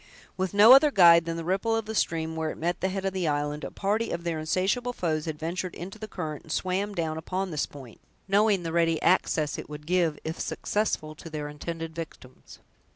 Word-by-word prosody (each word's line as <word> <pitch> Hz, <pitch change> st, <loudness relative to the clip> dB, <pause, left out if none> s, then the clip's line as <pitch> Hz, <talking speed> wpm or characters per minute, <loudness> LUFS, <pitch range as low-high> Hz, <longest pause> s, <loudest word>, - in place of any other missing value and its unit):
With 190 Hz, +1 st, -2 dB
no 215 Hz, +5 st, +9 dB
other 275 Hz, +3 st, +7 dB
guide 170 Hz, -, +7 dB
than 165 Hz, 0 st, -3 dB
the 165 Hz, -, -4 dB
ripple 195 Hz, +6 st, 0 dB
of 225 Hz, -1 st, -1 dB
the 220 Hz, -, -5 dB
stream 160 Hz, -5 st, -1 dB
where 160 Hz, -1 st, -2 dB
it -, -, -6 dB
met 175 Hz, +2 st, -2 dB
the 190 Hz, -, +1 dB
head 195 Hz, 0 st, -3 dB
of 195 Hz, -, -1 dB
the 185 Hz, -3 st, -1 dB
island, 145 Hz, 0 st, -1 dB
a -, -, -4 dB
party 215 Hz, +3 st, -1 dB
of 170 Hz, -, -4 dB
their 170 Hz, -2 st, -2 dB
insatiable 190 Hz, -, 0 dB
foes 155 Hz, -7 st, -1 dB
had 160 Hz, -2 st, -4 dB
ventured 175 Hz, +3 st, -4 dB
into 195 Hz, +5 st, -8 dB
the 215 Hz, -, -6 dB
current, 155 Hz, -7 st, -5 dB
and 160 Hz, -, -12 dB
swam 190 Hz, +4 st, -1 dB
down 160 Hz, -2 st, -2 dB
upon 185 Hz, +3 st, -3 dB
this 150 Hz, -2 st, -1 dB
point, 130 Hz, -6 st, -13 dB, 0.3 s
knowing 200 Hz, -1 st, +3 dB
the 165 Hz, -1 st, -4 dB
ready 165 Hz, -2 st, +2 dB
access 150 Hz, -2 st, +2 dB
it -, -, -8 dB
would 150 Hz, 0 st, -8 dB
give, 170 Hz, -3 st, +1 dB
if 160 Hz, +2 st, -5 dB
successful, 205 Hz, -7 st, -2 dB
to 160 Hz, +2 st, -11 dB
their 150 Hz, -2 st, -4 dB
intended 165 Hz, +2 st, -6 dB
victims. 155 Hz, -6 st, -10 dB
170 Hz, 220 wpm, -27 LUFS, 155-195 Hz, 0.3 s, no